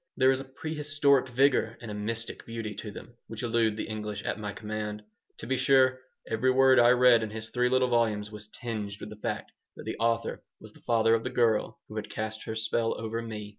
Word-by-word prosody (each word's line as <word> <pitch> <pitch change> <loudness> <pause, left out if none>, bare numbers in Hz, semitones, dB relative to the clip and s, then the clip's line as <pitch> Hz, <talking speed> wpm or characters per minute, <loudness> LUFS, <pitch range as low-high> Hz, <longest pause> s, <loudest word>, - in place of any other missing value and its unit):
There 130 0 +5
is 130 - 0
a 135 - -7
prehistoric 145 -1 +1
vigor 125 -3 +2
and 115 -3 -7
a - - -4
mystic 110 +2 -4
beauty 115 -2 -4
to 110 - -7
them 110 +3 -10
which 115 +1 -7
elude 115 -2 +1
the - - -3
English 105 -1 -5
at - - -2
my 105 -1 -4
command. 105 0 -5 0.3
To - - -8
be 130 +2 0
sure, 130 -1 +4 0.3
every 115 +3 +1
word 130 0 +6
I 120 0 +7
read 125 -2 +6
in 110 - -3
his 110 +1 -7
three 125 0 +2
little 130 0 +3
volumes 110 -3 +1
was 105 0 -9
tinged 110 -3 -5
with 105 - -8
the - - -7
fact - - -3 0.2
that - - -9
the - - -4
author 115 0 0 0.2
was - - -13
the - - -18
father 115 -1 +4
of 115 0 +2
the - - -2
girl 115 -4 +1
who 110 - -8
had 105 - -4
cast 110 0 -5
her 110 - -4
spell 115 +1 0
over 115 +1 -3
me. 105 -2 -6
115 Hz, 225 wpm, -29 LUFS, 110-125 Hz, 0.3 s, I